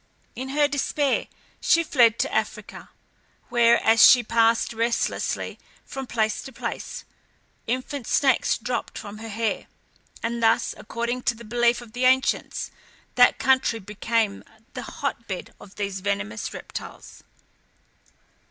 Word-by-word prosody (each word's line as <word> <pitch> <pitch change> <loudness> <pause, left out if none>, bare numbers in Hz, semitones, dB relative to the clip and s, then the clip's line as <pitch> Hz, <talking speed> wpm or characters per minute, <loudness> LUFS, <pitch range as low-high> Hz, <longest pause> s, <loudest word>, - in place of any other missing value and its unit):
In 260 +2 -5
her 290 +1 +3
despair 285 0 0 0.3
she 335 - +3
fled 235 -7 +4
to - - -1
Africa, - - -3 0.6
where, 235 -1 +5
as 225 0 +5
she 245 -2 +8
passed 230 +1 +2
restlessly 230 +1 -1 0.3
from 270 -1 -6
place 220 -3 0
to 270 - -9
place, 230 - -6 0.6
infant 255 +1 -3
snakes 265 -3 +2
dropped 245 +2 -4
from 210 -1 -8
her 225 0 -7
hair, 220 +1 -2 0.6
and 235 0 -2
thus, 225 0 +3
according 235 +3 -3
to 265 -2 0
the 235 +1 -12
belief 240 +2 +2
of 230 -2 -13
the 250 +1 0
ancients, 260 +1 +1 0.4
that 245 0 +5
country 260 -3 +2
became 210 +1 -1 0.3
the - - -5
hotbed 230 -9 -5
of 195 - -14
these 200 -2 -3
venomous 185 - -3
reptiles. - - -9
235 Hz, 130 wpm, -24 LUFS, 220-255 Hz, 0.6 s, she